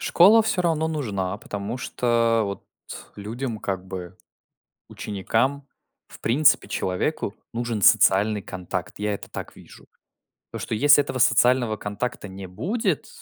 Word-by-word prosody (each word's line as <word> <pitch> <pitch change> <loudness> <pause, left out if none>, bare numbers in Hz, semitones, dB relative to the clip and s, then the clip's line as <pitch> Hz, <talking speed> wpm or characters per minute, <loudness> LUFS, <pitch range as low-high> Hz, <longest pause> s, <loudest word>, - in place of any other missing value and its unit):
Школа 210 +6 +6
всё 185 -4 0
равно 160 -2 +1
нужна, 105 -12 -3
потому 105 +3 -5
что, 115 -2 +1
вот, 100 -1 -5 0.5
людям, 115 +3 -5
как 95 -3 -4
бы, 90 -1 -8 0.7
ученикам, 120 +8 -2 0.4
в - - -15
принципе, 140 +7 +3
человеку 100 +4 -2 0.2
нужен 115 -3 -3
социальный 105 +3 +4
контакт. 90 +1 -6
Я 105 0 -1
это - - -8
так - - -8
вижу. - - -16 0.7
То, - - -5
что - - -3
если 145 +4 +6
этого 135 -2 -5
социального 120 0 +3
контакта 105 +1 -5
не 95 0 -8
будет, 165 - -2
110 Hz, 130 wpm, -24 LUFS, 100-135 Hz, 0.7 s, Школа